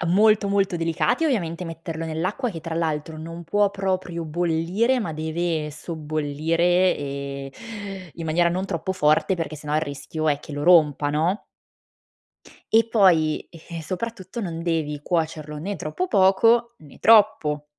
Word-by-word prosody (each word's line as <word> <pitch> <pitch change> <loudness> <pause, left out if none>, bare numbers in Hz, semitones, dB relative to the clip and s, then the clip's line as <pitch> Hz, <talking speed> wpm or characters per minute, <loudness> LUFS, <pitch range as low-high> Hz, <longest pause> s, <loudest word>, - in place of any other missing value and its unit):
A 170 - -2
molto, 210 +3 +4
molto, 195 -2 +1
delicati, 165 - 0
ovviamente, 180 - -1
metterlo 165 -1 -6
nell'acqua, 180 - -2
che 165 -5 -7
tra 165 0 -5
l'altro, 155 -1 -2
non 165 +2 -7
può 205 +5 +2
proprio 185 -3 -2
bollire, 175 +9 +1
ma 175 -8 -3
deve 160 0 -2
sobbollire, 160 +3 0
ehm, 140 -1 -5 0.6
in 165 - -7
maniera 170 +2 +2
non 180 +2 -1
troppo 190 -1 -3
forte, 155 +2 +2
perché 160 -3 -4
sennò, 150 0 -4
il 155 - +3
rischio 155 +1 -3
è 145 - +2
che 150 - -11
lo 145 0 -4
rompa, 150 -4 +4
no? 165 +7 0 1.3
E 225 0 +5
poi, 175 -9 +4
eh, 165 0 -9
soprattutto, 190 +4 -5
non 165 -4 -4
devi 155 -4 -1
cuocerlo 155 -3 -2
né 200 +6 -3
troppo 170 - -3
poco, 225 - +4
né 145 -3 -16
troppo. 205 -10 +4
165 Hz, 150 wpm, -24 LUFS, 155-190 Hz, 1.3 s, E